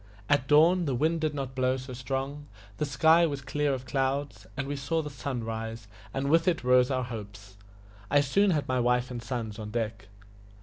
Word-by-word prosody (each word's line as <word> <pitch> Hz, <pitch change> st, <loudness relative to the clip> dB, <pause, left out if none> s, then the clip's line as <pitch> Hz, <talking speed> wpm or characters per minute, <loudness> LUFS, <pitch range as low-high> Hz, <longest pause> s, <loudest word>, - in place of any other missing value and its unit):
At 145 Hz, -2 st, +2 dB
dawn 165 Hz, +5 st, +5 dB
the 135 Hz, -4 st, 0 dB
wind 160 Hz, +5 st, +1 dB
did 155 Hz, -2 st, 0 dB
not 135 Hz, -2 st, -4 dB
blow 130 Hz, 0 st, +1 dB
so 130 Hz, 0 st, -8 dB
strong, 135 Hz, +3 st, -4 dB, 0.3 s
the 150 Hz, -, -1 dB
sky 160 Hz, +5 st, +5 dB
was 140 Hz, -2 st, -3 dB
clear 145 Hz, +2 st, -1 dB
of 130 Hz, -1 st, -3 dB
clouds, 135 Hz, -4 st, -2 dB
and 140 Hz, 0 st, -2 dB
we 145 Hz, -, -2 dB
saw 150 Hz, +4 st, -1 dB
the 150 Hz, -, -6 dB
sun 130 Hz, -2 st, -4 dB
rise, 110 Hz, -1 st, -5 dB, 0.2 s
and 135 Hz, +3 st, -2 dB
with 165 Hz, +1 st, +4 dB
it 170 Hz, -6 st, +1 dB
rose 125 Hz, 0 st, +4 dB
our 130 Hz, -2 st, 0 dB
hopes. 105 Hz, -4 st, -8 dB, 0.5 s
I 145 Hz, 0 st, +5 dB
soon 195 Hz, +9 st, +3 dB
had 155 Hz, -5 st, 0 dB
my 130 Hz, -1 st, +1 dB
wife 125 Hz, +1 st, +1 dB
and 120 Hz, -1 st, -5 dB
sons 115 Hz, -3 st, -4 dB
on 105 Hz, -1 st, -6 dB
deck. 110 Hz, -2 st, -3 dB
130 Hz, 205 wpm, -28 LUFS, 120-145 Hz, 0.5 s, dawn